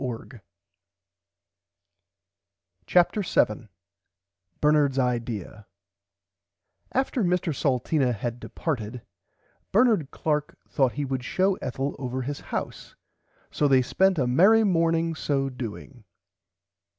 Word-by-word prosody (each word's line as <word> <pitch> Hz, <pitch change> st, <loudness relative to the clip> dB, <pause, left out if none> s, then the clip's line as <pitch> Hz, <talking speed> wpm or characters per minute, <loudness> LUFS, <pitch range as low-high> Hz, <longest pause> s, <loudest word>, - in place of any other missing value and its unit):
[Pg 130 Hz, -, -2 dB
74] 120 Hz, -1 st, -8 dB, 2.5 s
CHAPTER 180 Hz, +4 st, +3 dB
7 140 Hz, -, 0 dB, 0.9 s
BERNARDS 150 Hz, -2 st, +3 dB
IDEAR 115 Hz, -5 st, -2 dB, 1.2 s
After 265 Hz, -2 st, 0 dB
Mr 180 Hz, -2 st, 0 dB
Salteena 135 Hz, 0 st, +1 dB
had 120 Hz, +2 st, -4 dB
departed 120 Hz, -8 st, -4 dB, 0.7 s
Bernard 215 Hz, -, +3 dB
Clark 150 Hz, -2 st, -2 dB
thourght 130 Hz, -3 st, +1 dB
he 145 Hz, -, -3 dB
would 130 Hz, -2 st, -3 dB
show 190 Hz, +8 st, +1 dB
Ethel 135 Hz, +2 st, -3 dB
over 130 Hz, 0 st, -3 dB
his 140 Hz, +3 st, -4 dB
house -, -, -6 dB, 0.6 s
so 150 Hz, -, +1 dB
they 130 Hz, -2 st, +4 dB
spent 190 Hz, +7 st, +2 dB
a 135 Hz, -, +2 dB
merry 195 Hz, -, +5 dB
morning 165 Hz, -3 st, +1 dB
so 140 Hz, -3 st, -1 dB
doing. 125 Hz, 0 st, -8 dB
140 Hz, 100 wpm, -26 LUFS, 125-165 Hz, 2.5 s, merry